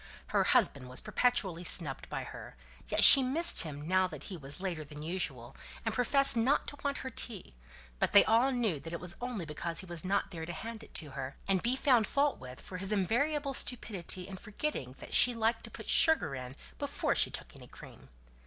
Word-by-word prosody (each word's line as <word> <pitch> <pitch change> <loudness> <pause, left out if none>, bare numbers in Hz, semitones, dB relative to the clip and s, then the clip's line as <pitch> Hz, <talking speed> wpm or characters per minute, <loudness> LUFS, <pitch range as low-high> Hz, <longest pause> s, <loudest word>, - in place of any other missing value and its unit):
Her - - +2
husband 130 -2 +2
was 125 - +1
perpetually 195 -9 0
snubbed 150 -6 -1
by - - -4
her, - - -10 0.3
yet - - +2
she 275 - +11
missed 280 +7 +3
him 150 -2 -3
now 185 +1 +2
that - - -9
he 195 - -7
was 140 -2 -5
later 180 -5 -4
than 150 0 -10
usual, 135 -8 -4 0.3
and 225 - -1
professed 275 +4 +4
not 255 +6 +2
to 290 - -11
want 280 0 -1
her 260 - -4
tea; 220 - -5 0.5
but - - +1
they 200 - +7
all 235 +5 +3
knew 225 - -1
that 165 +4 -9
it 170 - -4
was 180 +1 -3
only 240 -8 -4
because 165 +3 -2
he - - -11
was 170 -3 -3
not 195 +2 -1
there 160 -3 -7
to 175 - -5
hand 225 +6 -7
it - - -17
to 150 -4 -3
her, 135 0 -6
and 190 -2 +2
be 245 +2 +1
found 250 -6 +3
fault 280 0 0
with 130 0 -10
for 185 - -9
his 195 +2 -2
invariable 275 - 0
stupidity 195 -8 -1
in 195 -1 -8
forgetting 210 - -5
that - - -11
she 245 -1 +5
liked 225 0 0
to - - -10
put - - -10
sugar 315 - +3
in 130 0 -7 0.2
before - - -1
she - - +2
took - - -7
any - - -13
cream. - - -14
190 Hz, 215 wpm, -31 LUFS, 160-245 Hz, 0.5 s, she